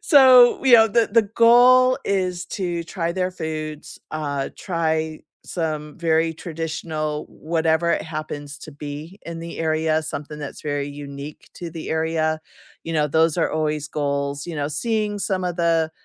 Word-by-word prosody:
so, 260 -5 +7
we 260 -3 +7
oh, 225 0 +6
the 230 +2 +2
the 230 - +6
goal 255 +2 +6
is 185 -2 -1
to 175 -3 -3
try 170 -1 -3
their 185 0 -1
foods, 155 -3 -6
uh, 145 -3 -2
try 160 -3 -1 0.3
some 155 -3 -4
very 165 -1 +2
traditional, 160 -2 -4
whatever 160 +1 0
it - - +1
happens 155 -2 -6
to 155 0 -11
be 150 +6 -8
in 170 0 -6
the 170 0 -7
area, 160 0 +1
something 150 -1 -6
that's 145 -2 -7
very 145 -1 -2
unique 145 0 -9
to 175 - -7
the 160 -1 -7
area, 160 0 0 0.4
you 165 - -5
know, 150 -1 +2
those 160 +2 +2
are 170 - +1
always 155 -1 -1
goals, 140 -1 -2
you 170 - -5
know, 145 -1 -1
seeing 210 +6 -1
some 190 -1 -1
of 180 -1 -2
the 165 -2 +2
160 Hz, 160 wpm, -22 LUFS, 150-180 Hz, 0.4 s, so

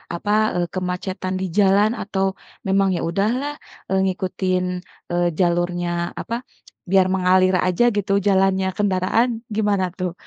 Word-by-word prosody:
apa, 205 +4 -3 0.3
eee, 175 -1 0
kemacetan 185 +1 -3
di - - -1
jalan 205 +2 +4
atau 195 -2 -1 0.4
memang, 195 0 +3
"Ya - - -2
udahlah, 240 +11 0 0.4
eee, 190 0 +2
ngikutin, 185 -1 -1 0.5
eee, 175 0 +2
jalurnya 175 0 0
apa, 235 +2 -4 0.5
biar 190 0 +4
mengalir 185 0 +3
aja 185 +7 +2
gitu 205 -3 -1
jalannya 190 -1 +2
kendaraan." 210 +4 +1
Gimana 205 -3 +1
tuh 180 -2 -2
190 Hz, 130 wpm, -21 LUFS, 180-205 Hz, 0.5 s, jalan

